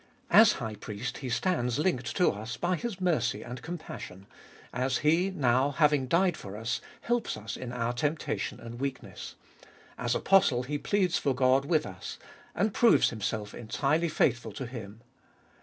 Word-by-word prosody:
As 220 -1 +8
High 110 -4 -4
Priest 105 +4 -6
He 130 - -5
stands 125 -3 0
linked 150 -6 0
to 180 - +4
us 110 +3 -6
by 175 +1 0
His 200 +2 -4
mercy 165 - 0
and 120 0 -7
compassion, 155 - -8 0.5
as 130 +1 0
He 170 +5 +4
now, 130 -6 +2
having 145 -2 +2
died 175 +4 +3
for 100 +1 -8
us, 115 +2 -2 0.2
helps 240 0 -1
us - - -6
in 125 -2 -6
our 120 -1 -1
temptation 150 +6 -2
and 120 0 -9
weakness; 135 -1 -5 0.6
as 120 -1 0
Apostle 185 -11 +4
He 145 +3 -3
pleads 190 -2 +1
for 140 -3 0
God 130 +1 +3
with 155 -1 +2
us, 90 -2 -7 0.4
and 205 +3 +1
proves 235 +2 +5
Himself 105 -1 -3
entirely 145 +8 0
faithful 125 -5 +1
to 130 - -5
Him. 115 -3 -8
130 Hz, 160 wpm, -29 LUFS, 120-170 Hz, 0.6 s, As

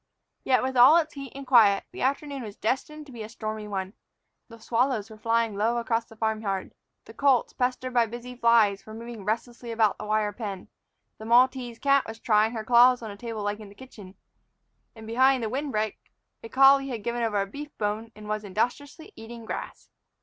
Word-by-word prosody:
Yet, 255 -1 +2
with 260 0 -2
all 255 +6 +8
its 315 -2 0
heat 275 -3 -8
and 275 0 -8
quiet, 220 -6 +5
the - - -8
afternoon 280 +1 -1
was 210 -4 -8
destined 300 +6 -3
to 280 - -14
be 235 -3 -9
a 215 - -7
stormy 215 -2 -6
one. 190 -1 -4 0.5
The 230 - -13
swallows 230 -1 -1
were 215 - -11
flying 230 -1 0
low 225 +4 +1
across 230 -1 -1
the 225 - -16
farm 220 0 -1
yard; 195 -3 -3 0.3
the - - -13
colts, 275 -3 +2
pestered 255 0 -2
by 235 -2 +3
busy 240 +2 -8
flies, 230 -4 +3
were 215 - -10
moving 230 -2 -8
restlessly 235 +2 -3
about 220 -3 +1
the 210 - -6
wire 210 -1 0
pen; 200 -4 -6 0.5
the 220 - -9
Maltese 245 0 +3
cat 275 +1 +3
was 225 0 -8
trying 220 0 +2
her 220 -2 -4
claws 245 +1 +5
on 220 - -6
a - - -9
table 225 -1 -6
leg 205 +1 -3
in 210 - -11
the 200 - -16
kitchen; 205 -6 -13 0.8
and, 220 -1 -11
behind 255 +3 +3
the 220 - -2
wind 275 +4 -3
break, 215 -1 -2 0.4
a 230 - -8
collie 275 +1 +5
had 235 -6 -5
given 240 +1 -2
over 220 -3 0
a 195 - 0
beef 290 +8 -10
bone 215 +2 -3
and 210 0 -11
was 215 0 -3
industriously 280 - -3
eating 230 +1 -10
grass. - - -7
230 Hz, 210 wpm, -26 LUFS, 215-255 Hz, 0.8 s, all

